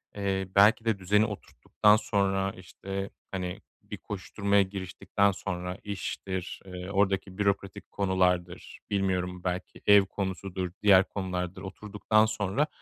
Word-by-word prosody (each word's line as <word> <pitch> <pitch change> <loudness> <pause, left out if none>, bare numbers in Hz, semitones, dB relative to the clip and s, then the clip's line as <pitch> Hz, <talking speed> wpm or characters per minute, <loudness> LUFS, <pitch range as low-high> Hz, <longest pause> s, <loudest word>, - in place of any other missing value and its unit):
eee, 95 -2 -1
belki 110 +3 +6
de 110 -3 +1
düzeni 105 +3 +3
oturttuktan 105 0 +1
sonra, 100 -3 0
işte, 95 +2 -6 0.2
hani, 90 -2 -4 0.2
bir - - -8
koşuşturmaya 100 0 0
giriştikten 95 +1 0
sonra, 90 -1 -4
iştir, 95 -2 -5
eee, 90 0 -7
oradaki 95 -1 0
bürokratik 100 -1 -1
konulardır, 90 -2 0
bilmiyorum 90 -2 -1
belki 90 0 -4
ev 100 -1 +7
konusudur, 95 -2 -4
diğer 95 -2 +7
konulardır, 95 -1 -4
oturduktan 105 +2 +1
sonra 110 +6 0
95 Hz, 115 wpm, -28 LUFS, 95-100 Hz, 0.2 s, ev